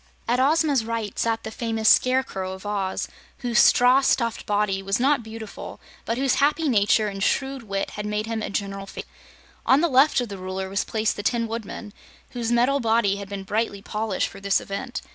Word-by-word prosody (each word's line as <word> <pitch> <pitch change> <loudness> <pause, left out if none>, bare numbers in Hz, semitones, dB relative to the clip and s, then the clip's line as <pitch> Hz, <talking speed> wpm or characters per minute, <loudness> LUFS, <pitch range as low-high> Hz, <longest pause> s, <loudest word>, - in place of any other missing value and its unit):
At 240 +2 +2
Ozma's 290 -2 +3
right 225 -2 -4
sat 225 -1 0
the 220 - -6
famous 225 -1 -2
Scarecrow 255 -9 +3
of 190 +2 -11
Oz, 200 -2 -2 0.3
whose 240 -3 +1
straw 250 +2 +6
stuffed 235 -4 0
body 205 -2 0
was 195 +2 -1
not 275 +1 +3
beautiful, 220 -1 -9 0.3
but 230 - -1
whose 270 -1 +1
happy 300 +3 +2
nature 215 -3 +3
and 195 -1 -5
shrewd 270 +5 0
wit 195 -3 -3
had 210 0 -5
made 210 +1 -2
him 225 -1 -3
a - - -3
general 195 -1 -4
favorite. - - -8 0.6
On 270 +3 +4
the 340 - +3
left 275 0 +4
of 245 -3 -3
the 200 -2 -7
Ruler 190 +1 -4
was 195 0 0
placed 220 -1 -1
the - - -3
Tin 230 +2 0
Woodman, 220 -2 -6 0.4
whose 240 -2 -3
metal 250 +4 +3
body 225 -4 +2
had 200 -1 -8
been 200 -1 -5
brightly 205 0 -2
polished 215 -2 -2
for 195 - -11
this 195 0 +2
event. 245 +6 -5
220 Hz, 200 wpm, -24 LUFS, 200-245 Hz, 0.6 s, straw